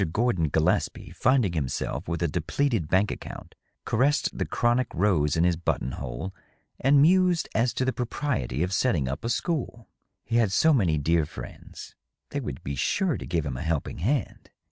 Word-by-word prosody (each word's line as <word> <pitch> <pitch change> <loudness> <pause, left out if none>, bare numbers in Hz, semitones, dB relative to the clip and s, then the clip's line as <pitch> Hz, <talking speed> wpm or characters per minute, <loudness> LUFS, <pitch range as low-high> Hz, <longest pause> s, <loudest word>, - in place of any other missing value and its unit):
Gordon 105 -9 +1
Gillespie, 80 +2 0
finding 125 -8 +2
himself 70 -6 -3
with 85 0 -2
a - - +2
depleted 90 - -1
bank 95 +5 +2
account, - - -8 0.3
caressed 145 +4 +1
the - - -2
chronic 120 +1 +1
rose 85 -6 +2
in 80 - +3
his 90 -1 +3
button 75 -5 -1
hole 65 +10 -5 0.5
and 140 +2 +4
mused 180 0 +4
as 115 +2 +2
to 130 - 0
the 130 - 0
pro 125 - -3
priety 75 - -2
of 90 +2 -2
setting 95 - +1
up 70 +3 -4
a 115 - -2
school. 120 -3 -2 0.4
He 115 - 0
had 110 -5 +3
so 160 +10 +4
many 90 - +2
dear 80 +1 +1
friends; - - -10 0.4
they - - -2
would - - -6
be 70 - -4
sure 175 - 0
to - - -7
give 85 -4 -1
him 65 -4 -3
a - - -5
helping 80 -3 -2
hand. 125 - -2
95 Hz, 185 wpm, -26 LUFS, 80-130 Hz, 0.5 s, and